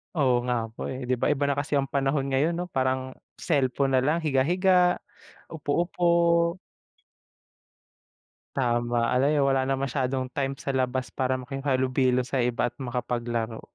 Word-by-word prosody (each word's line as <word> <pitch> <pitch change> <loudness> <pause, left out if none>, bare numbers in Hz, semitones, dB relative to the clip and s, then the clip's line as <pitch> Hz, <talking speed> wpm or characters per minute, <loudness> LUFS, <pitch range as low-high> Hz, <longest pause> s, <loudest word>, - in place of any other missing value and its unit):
oo 130 -5 +2
nga 120 -2 0
po 110 - -6
eh, 130 0 -5
'di 130 - +2
ba? - - +2
Iba 145 -1 0
na 140 - +1
kasi 145 +1 -1
ang 140 -1 +1
panahon 135 0 0
ngayon, 150 +6 +1
'no? 180 +1 -3
Parang 130 0 -1 0.2
cellphone 135 0 +1
nalang, 150 +6 +1
higa-higa, 180 +6 +3 0.5
upo-upo. 170 +2 +1 2.0
Tama, 120 -2 +1
ano, 130 +3 +3
eh, 150 - +2
wala 135 -1 +3
na 135 +1 0
masyadong 130 -1 -1
time 135 -1 -2
sa 135 - -4
labas 130 -2 -1
para 130 0 0
makihalubilo 130 -1 0
sa 130 0 -1
iba 120 0 0
at 120 - -3
makapaglaro. 120 -2 -3
135 Hz, 145 wpm, -26 LUFS, 125-145 Hz, 2.0 s, higa-higa